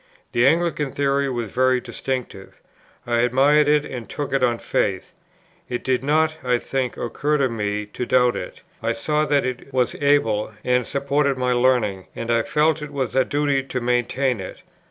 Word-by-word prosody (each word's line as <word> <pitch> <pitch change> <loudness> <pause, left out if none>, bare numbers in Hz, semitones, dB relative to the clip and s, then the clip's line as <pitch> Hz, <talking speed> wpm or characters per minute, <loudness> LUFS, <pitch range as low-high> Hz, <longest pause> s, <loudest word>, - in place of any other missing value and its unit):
The 120 +2 +3
Anglican 155 -3 +1
Theory 140 0 0
was 120 -4 -3
very 130 0 +2
distinctive. 125 -6 -5 0.5
I 120 -1 +1
admired 135 +5 +4
it 150 0 +3
and 120 -4 -7
took 145 -2 -4
it 135 - +2
on 120 -2 +2
faith. 95 -4 -2 0.6
It 120 - -3
did 130 -1 0
not 155 +2 +2
(I 125 -1 +2
think) 130 0 -3
occur 145 +6 -1
to 135 -2 +2
me 105 -2 -2
to 120 +4 -6
doubt 125 -1 +3
it; 90 - -7 0.2
I 115 - 0
saw 150 +7 0
that 145 -2 +2
it 130 +1 -5
was 130 -2 +1
able, 115 -7 +2
and 125 -1 +1
supported 140 0 0
by 125 0 0
learning, 120 -6 +1
and 115 0 -3
I 115 0 +3
felt 155 +5 +1
it 150 0 -7
was 135 -2 -3
a 130 - +5
duty 145 -1 0
to 130 -1 -4
maintain 125 +1 0
it. 95 - -9
130 Hz, 180 wpm, -22 LUFS, 120-140 Hz, 0.6 s, a